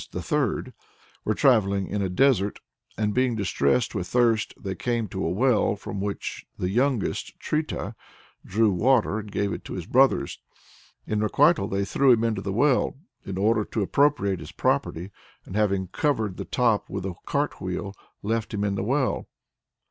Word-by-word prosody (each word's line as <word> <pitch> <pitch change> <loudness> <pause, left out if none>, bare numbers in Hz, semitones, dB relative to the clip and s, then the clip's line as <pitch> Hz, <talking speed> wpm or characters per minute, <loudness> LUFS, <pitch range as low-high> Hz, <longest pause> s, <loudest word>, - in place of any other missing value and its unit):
_ - - -38
the - - -5
third) - - -1 0.5
were 110 - 0
travelling 100 -8 +3
in 105 +1 -2
a 95 - 0
desert, 105 -1 +2 0.4
and 105 -1 0
being 125 0 +2
distressed 100 - +1
with 90 -5 -3
thirst, 115 -1 +2 0.3
came 120 -3 -1
to 95 0 -4
a 80 - 0
well, 110 +3 +2
from 100 -1 -6
which 100 0 -4
the 90 0 -2
youngest, 125 0 0
Trita, 155 0 -2 0.5
drew 110 +1 +2
water 110 +2 +2
and 105 -1 -8
gave 100 0 -1
it - - -6
to - - -6
his 90 -3 -5
brothers; 135 +6 +2 0.7
in 105 - -1
requital, 140 - +3
they 100 0 -1
drew 135 +5 +3
him 115 -1 +1
into 110 -4 0
the 100 - -3
well, 130 +5 +2 0.3
in 95 -1 -4
order 105 +2 +2
to 105 0 -2
appropriate 100 -6 +2
his - - -9
property 90 +5 -1 0.3
and 95 - -8
having 100 -3 +1
covered 110 - 0
the - - -5
top 115 -4 +1
with 95 -1 -4
a 95 - -3
cart - - -1
wheel, 100 -1 -4 0.3
left 115 +1 -1
him 100 - -1
in 100 -1 0
the 100 - -2
well. 130 +4 0
105 Hz, 175 wpm, -25 LUFS, 100-125 Hz, 0.7 s, travelling